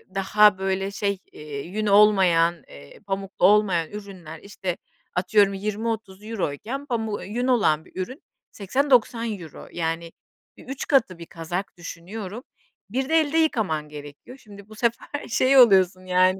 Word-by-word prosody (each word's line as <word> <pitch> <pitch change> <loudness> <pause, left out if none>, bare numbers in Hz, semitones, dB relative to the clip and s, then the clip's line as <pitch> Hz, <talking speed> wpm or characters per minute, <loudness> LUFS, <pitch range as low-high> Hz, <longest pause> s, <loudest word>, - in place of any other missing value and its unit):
daha 205 +1 +4
böyle 195 0 -2
şey, 200 -1 -2
eee, 150 -2 -8
yün 215 +4 -3
olmayan, 190 -5 +4
eee, 70 0 -14
pamuklu 195 -1 -1
olmayan 190 -5 +3
ürünler, 190 -6 -9
işte, 190 -3 -5 0.4
atıyorum, 195 +2 +3
€20-€30 210 0 -4
euro 215 -9 -3
iken 265 - -6
pamu 225 -5 -2
ııı, - - -7
yün 240 +5 -2
olan 180 -11 +2
bir 185 - -7
ürün 255 - -7 0.3
€80-€90 230 -1 +1
euro, 160 -4 -11
yani 165 0 -3 0.5
bir - - -14
3 270 0 -5
katı. 230 - +2
Bir 170 - -8
kazak 175 +4 -6
düşünüyorum, 190 +7 -8 0.5
bir 260 +5 -2
de 320 - +2
elde 310 +1 -1
yıkaman 205 - 0
gerekiyor. 145 - -11
Şimdi 205 -3 -15
bu 215 - -12
sefer 235 +5 -2
şey 260 +4 +3
oluyorsun 190 -6 +5
yani 185 +1 +3
200 Hz, 150 wpm, -24 LUFS, 180-225 Hz, 0.5 s, oluyorsun